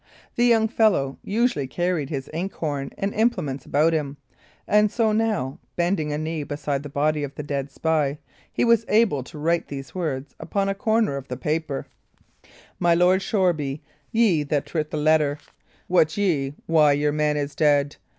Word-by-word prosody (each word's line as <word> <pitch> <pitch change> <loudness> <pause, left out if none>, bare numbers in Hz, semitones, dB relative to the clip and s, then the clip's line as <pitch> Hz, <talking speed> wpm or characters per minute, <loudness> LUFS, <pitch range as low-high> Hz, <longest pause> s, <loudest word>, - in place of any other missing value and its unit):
The 240 - +3
young 225 -2 +4
fellow 205 - +1
usually 215 - 0
carried 175 -2 -1
his 135 -3 -4
ink 180 +5 -3
horn 145 -4 -3
and 195 +1 -2
implements 150 - -1
about 155 +3 +3
him, 145 -3 -2 0.5
and 210 0 +4
so 225 -2 +2
now, 210 - -1 0.2
bending 170 -3 0
a 150 - -1
knee 155 0 -3
beside 145 -1 -3
the 145 - -8
body 150 +2 0
of 140 -1 -6
the 150 - -5
dead 140 -1 -3
spy, 150 -2 0 0.3
he - - +1
was 230 -1 +4
able 210 - +3
to 130 - -11
write 165 +3 0
these 135 -2 -7
words 145 -7 -3
upon 195 -1 -1
a - - +1
corner 220 - +1
of 135 -1 -8
the 125 - -5
paper: 150 +1 -2 0.9
My 175 -1 +4
Lord 180 +2 +4
of - - -5
Shoreby, 170 - 0 0.3
ye 220 -9 +3
that 145 -1 -1
writt 155 -2 -1
the 155 - -4
letter, 150 -1 +2 0.5
wot 160 -2 +2
ye 150 -9 0
why 155 -3 +4
your 145 +1 +1
man 150 0 +1
is 145 0 -3
ded? 145 -1 +2
155 Hz, 180 wpm, -24 LUFS, 145-190 Hz, 0.9 s, young